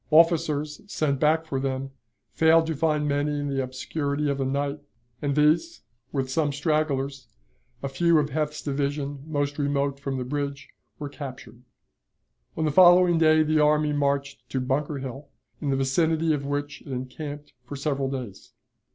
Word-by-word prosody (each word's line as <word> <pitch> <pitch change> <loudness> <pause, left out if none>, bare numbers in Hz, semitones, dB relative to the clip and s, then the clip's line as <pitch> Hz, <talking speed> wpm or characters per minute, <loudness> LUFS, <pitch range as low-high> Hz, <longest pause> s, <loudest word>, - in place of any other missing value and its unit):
Officers 155 -2 +3
sent 145 -8 -1
back 160 +2 +3
for 135 -4 -2
them 135 0 -3 0.4
failed 160 0 +4
to 160 -1 -2
find 150 0 +1
many 145 +1 0
in 145 0 -2
the 135 -1 0
obscurity 140 +3 -2
of 140 - -3
the 135 - 0
night, 140 +2 -1 0.4
and 140 -2 0
these, 155 - +2 0.3
with 135 -2 -1
some 145 +2 0
stragglers, 140 -2 -1 0.6
a - - 0
few 170 +5 +3
of 150 -1 +1
Heth's 150 +1 -2
division 140 0 -2
most 145 -1 -2
remote 140 -1 0
from 135 -1 -3
the 130 - -2
bridge, 140 +2 -4 0.3
were 145 - -5
captured. 130 -5 -9 1.0
On 160 - 0
the 155 - +1
following 175 +1 +6
day 155 -1 +5
the 155 0 +2
army 150 0 +3
marched 140 -1 -1
to 135 - -1
Bunker 140 +3 -1
Hill, 135 +1 -7 0.3
in 145 - -1
the 135 - +2
vicinity 160 +4 +2
of 140 -2 -3
which 145 +1 -3
it - - -17
encamped 145 +3 -6
for 145 - -6
several 140 -1 -1
days. 125 -8 -7
145 Hz, 165 wpm, -26 LUFS, 140-155 Hz, 1.0 s, following